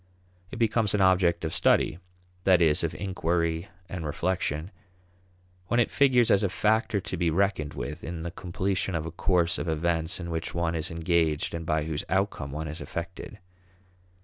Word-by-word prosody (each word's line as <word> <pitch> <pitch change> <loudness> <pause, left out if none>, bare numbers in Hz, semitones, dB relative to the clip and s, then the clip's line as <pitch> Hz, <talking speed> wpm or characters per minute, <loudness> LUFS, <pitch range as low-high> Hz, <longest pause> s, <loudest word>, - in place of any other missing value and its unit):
It - - -7
becomes 110 -2 +2
an 100 - +1
object 90 -3 +3
of 80 - -2
study 80 - +3 0.4
that 95 -2 +5
is, 80 -3 +3
of - - -1
inquiry 85 -2 -1 0.2
and 90 -2 -5
reflection 85 +1 -2 1.0
when 120 - +2
it 120 - +2
figures 125 -4 +4
as 100 - +5
a 100 - +1
factor 110 +3 +1
to 95 - -5
be 85 -1 +1
reckoned 90 -3 0
with 75 +2 -5
in 80 -1 -5
the 85 - -4
completion 95 +1 -2
of 80 -1 -2
a 80 - -5
course 90 0 +1
of - - -3
events 80 +2 0
in 85 -1 -5
which 80 0 -3
one 85 -1 0
is 80 -2 -2
engaged 80 -2 0
and 85 -1 -5
by 80 0 +1
whose 80 -1 -3
outcome 95 -6 -1
one 80 +2 -4
is 80 +2 -6
affected. 85 +5 -6
85 Hz, 175 wpm, -27 LUFS, 80-95 Hz, 1.0 s, that